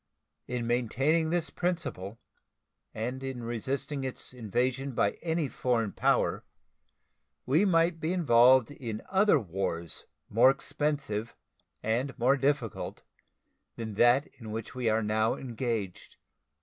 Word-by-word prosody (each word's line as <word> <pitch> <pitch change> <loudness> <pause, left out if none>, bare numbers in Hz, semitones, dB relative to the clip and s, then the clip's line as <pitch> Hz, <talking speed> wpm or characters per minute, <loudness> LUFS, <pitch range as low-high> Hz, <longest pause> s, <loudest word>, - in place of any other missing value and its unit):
In 120 -1 -2
maintaining 135 +7 +1
this 170 -1 -1
principle 160 - -3 0.7
and 125 +4 -4
in 130 -3 -5
resisting 130 +5 -3
its 130 -1 -5
invasion 125 +4 -1
by 100 -3 +2
any 165 -2 0
foreign 120 -5 0
power - - +1 1.0
we 155 +10 +3
might 165 -2 +3
be 160 +2 -1
involved 130 -7 +5
in 115 -6 -6
other 195 -4 +4
wars 85 -4 -4 0.2
more 115 +5 +6
expensive 140 -5 -2 0.5
and 125 +6 -1
more 130 +2 +4
difficult 135 -4 -1 0.7
than 110 -2 -5
that 120 +6 +4
in 115 -3 -8
which 110 0 -5
we 125 -3 0
are 110 0 +2
now 110 +1 +1
engaged. 115 -6 -4
125 Hz, 120 wpm, -29 LUFS, 115-145 Hz, 1.0 s, more